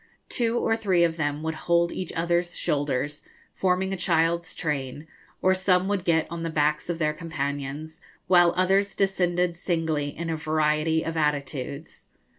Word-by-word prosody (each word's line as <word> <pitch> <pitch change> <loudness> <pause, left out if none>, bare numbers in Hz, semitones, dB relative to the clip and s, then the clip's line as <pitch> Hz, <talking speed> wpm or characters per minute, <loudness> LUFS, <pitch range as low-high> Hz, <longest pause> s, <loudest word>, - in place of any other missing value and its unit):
Two 235 -1 +1
or 225 - +2
three 190 -6 +2
of 165 -1 +2
them 145 -1 -2
would 160 0 -1
hold 170 +1 +1
each 185 - -4
other's 175 +1 0
shoulders, 145 0 -1 0.3
forming 190 +1 +1
a - - 0
child's 170 -1 +1
train, 145 -2 -3 0.4
or 185 - +5
some 185 0 +2
would 200 -3 0
get 160 -3 +2
on 170 0 -6
the 165 - -2
backs 150 +1 0
of 170 - -1
their 155 -2 +1
companions, 155 0 -4 0.2
while 175 -2 +5
others 195 +2 +2
descended 180 -3 +1
singly 160 -4 -1
in 165 +3 -4
a - - 0
variety 155 +1 +1
of 165 - -4
attitudes. 145 -1 -2
165 Hz, 160 wpm, -26 LUFS, 150-180 Hz, 0.4 s, or